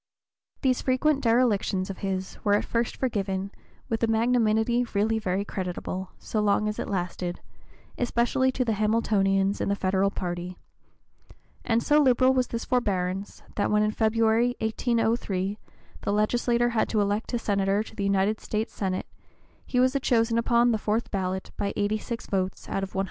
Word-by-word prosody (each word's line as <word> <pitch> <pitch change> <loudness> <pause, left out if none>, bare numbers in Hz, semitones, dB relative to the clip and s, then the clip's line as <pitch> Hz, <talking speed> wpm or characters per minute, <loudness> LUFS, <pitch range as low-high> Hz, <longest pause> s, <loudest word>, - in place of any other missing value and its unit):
These 255 -2 +2
frequent 275 +2 +1
derelictions 220 -5 +2
of 190 - -9
his 190 -1 -3
were 205 -1 +4
at 205 - 0
first 235 0 -1
forgiven 195 -5 -2 0.4
with 225 - -2
a 230 - +3
magnanimity 225 +1 +2
really 220 +2 +2
very 195 -1 -1
creditable, 185 -1 -4
so 215 - -3
long 210 0 +2
as 210 - -3
it - - -3
lasted, 180 -1 -3 0.6
especially 245 +2 +1
to 255 - 0
the 225 - +1
Hamiltonians 200 -2 +1
in - - 0
the 200 - +2
Federal 190 0 +1
party; 180 -1 -5 1.1
and 230 0 +1
so 300 0 +4
liberal 260 -1 +4
was 255 -2 +1
this 230 - -4
forbearance 195 -5 -1
that 205 - +1
when 210 0 +3
in 215 - +1
February, 225 +2 +2
1803, 220 -3 0 0.4
the - - -1
legislature 240 +3 +2
had 230 -2 0
to 220 - +1
elect 205 +2 0
a - - +2
Senator 200 -2 +1
to - - -13
the 200 - -3
United 200 +2 +1
States 215 +1 -3
Senate, 185 -2 -2 0.6
he 250 - 0
was 255 +2 +3
chosen 230 -2 +2
upon 235 +1 +3
the 220 - 0
fourth 215 +3 -1
ballot 190 -1 -2
by 200 -1 -1
86 215 +3 -2
votes 190 -1 -2
out 195 - -2
of 195 0 -6
171. - - 0
215 Hz, 165 wpm, -26 LUFS, 195-235 Hz, 1.1 s, were